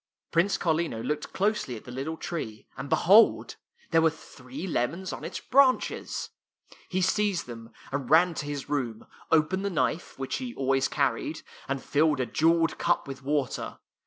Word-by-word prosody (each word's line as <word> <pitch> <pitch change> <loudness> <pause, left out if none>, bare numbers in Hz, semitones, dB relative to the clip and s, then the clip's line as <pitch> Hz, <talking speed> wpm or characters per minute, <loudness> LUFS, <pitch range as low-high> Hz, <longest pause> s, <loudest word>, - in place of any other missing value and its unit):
Prince 175 +4 +2
Carlino 160 -9 0
looked 150 0 -3
closely 200 - 0
at 110 - -10
the 125 - -10
little 140 +6 -4
tree, 110 -13 -5
and 140 - -6
behold! 205 +10 +5 0.3
there 165 -1 +5
were 160 - +5
three 145 -1 -9
lemons 170 +3 -2
on - - -7
its - - -5
branches. 265 0 +2 0.6
He 185 0 0
seized 200 -1 +1
them 115 -1 -10 0.2
and 140 -2 -3
ran 170 +3 +5
to 150 - -5
his 145 -1 -4
room, 130 -7 -2 0.3
opened 165 +5 +3
the 200 - 0
knife, 170 -1 -1
which 135 0 -3
he 250 -2 -6
always 135 0 +1
car 140 -4 +1
ried, 155 +7 -6 0.2
and 135 -1 -3
filled 150 -1 +2
a 130 - +1
jeweled 165 +6 +2
cup 175 -4 +1
with 135 0 -7
water. 140 -2 -2
155 Hz, 170 wpm, -27 LUFS, 135-175 Hz, 0.6 s, behold